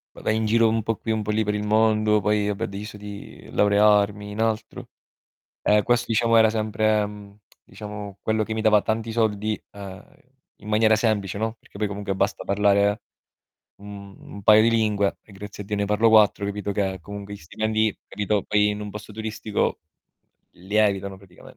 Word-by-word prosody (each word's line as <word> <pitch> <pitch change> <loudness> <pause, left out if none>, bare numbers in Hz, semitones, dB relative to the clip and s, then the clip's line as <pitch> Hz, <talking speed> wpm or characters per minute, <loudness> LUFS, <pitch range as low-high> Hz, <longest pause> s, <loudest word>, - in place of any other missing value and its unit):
Va - - -11
vai 110 - 0
in 110 - 0
giro 115 +1 +3
un 110 0 0
po' 115 +1 -1
qui 110 - -4
un 110 -1 0
po' 105 - -2
lì 110 +1 +1
per 105 0 -1
il 105 - -2
mondo, 110 0 +3
poi, 105 0 +1
va 105 - -1
beh, - - -5
ho - - -1
deciso 105 +2 -8
di 105 0 -10
laurearmi 105 0 +3
in 105 - -7
altro. 110 0 -2 0.8
Ehm, 105 0 +3
questo 120 +1 +1
diciamo 115 0 +2
era 110 -1 +6
sempre, 110 -1 +1
mhmm, 105 -1 -12 0.3
diciamo 105 0 -9
quello 110 0 0
che 110 - -5
mi 110 - -2
dava 105 -2 +4
tanti 110 0 -2
soldi, 110 -1 0
ehm, 95 -2 -10 0.5
in 105 - -13
maniera 110 +1 +4
semplice, 105 -3 -1
no, 110 +1 -2
perché - - -15
poi 105 - 0
comunque 100 -1 -4
basta 100 +1 -1
parlare 100 +1 +2 0.8
un 100 -1 -10
un 100 - -11
paio 110 +2 +7
di 115 - +4
lingue, 105 -3 +1
e 105 - -18
grazie 105 +1 -9
a 100 - -14
Dio 105 - -2
ne 100 - 0
parlo 105 +3 +3
4, 105 -2 +4
capito, 100 0 -3
che 95 -2 -1
comunque 100 +3 -8
gli - - -8
stipendi, 110 +4 -1
capito, 105 0 -1
poi 105 0 +2
in 105 0 -3
un 105 - -6
posto 105 +1 -9
turistico, 110 -1 -2 0.7
lievitano 100 0 -1
praticame 95 -2 -17
105 Hz, 195 wpm, -24 LUFS, 100-110 Hz, 0.8 s, paio